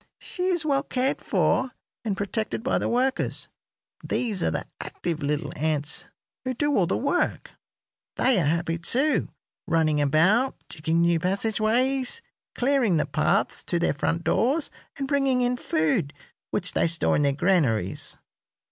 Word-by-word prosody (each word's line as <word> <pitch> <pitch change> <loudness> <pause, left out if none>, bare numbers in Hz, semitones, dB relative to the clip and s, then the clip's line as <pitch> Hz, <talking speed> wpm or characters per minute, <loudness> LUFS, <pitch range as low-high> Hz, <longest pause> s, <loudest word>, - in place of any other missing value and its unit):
She 360 -1 -3
is 345 -4 +1
well 275 -2 +2
cared 265 -1 -1
for 260 -1 +1 0.3
and 205 -4 -2
protected 215 +2 -2
by 265 - +1
the - - -1
workers. 255 +2 0 0.5
These 215 -7 -2
are - - +2
the 80 - -3
active 165 -3 -4
little 150 +2 -1
ants 150 -1 -1 0.4
who 255 -1 -2
do 290 -6 +2
the - - 0
work. 285 +7 -1 0.6
They 255 -6 +3
are - - 0
happy, 165 +2 0
too, 265 - +2 0.4
running 155 -2 +2
about, 185 - +3
digging 160 +1 0
new 170 -1 +3
passageways, 230 - 0 0.3
clearing 245 -8 +2
the - - +1
paths - - 0
to 175 - 0
their 170 - +1
front 165 +4 -1
doors, 275 - +1 0.3
and 275 - -3
bringing 270 -3 +2
in 245 0 +1
food, 155 - 0 0.3
which - - -1
they - - +3
store 170 +1 +2
in - - +2
their 140 -1 +4
granaries. 135 - 0
200 Hz, 145 wpm, -25 LUFS, 160-260 Hz, 0.6 s, their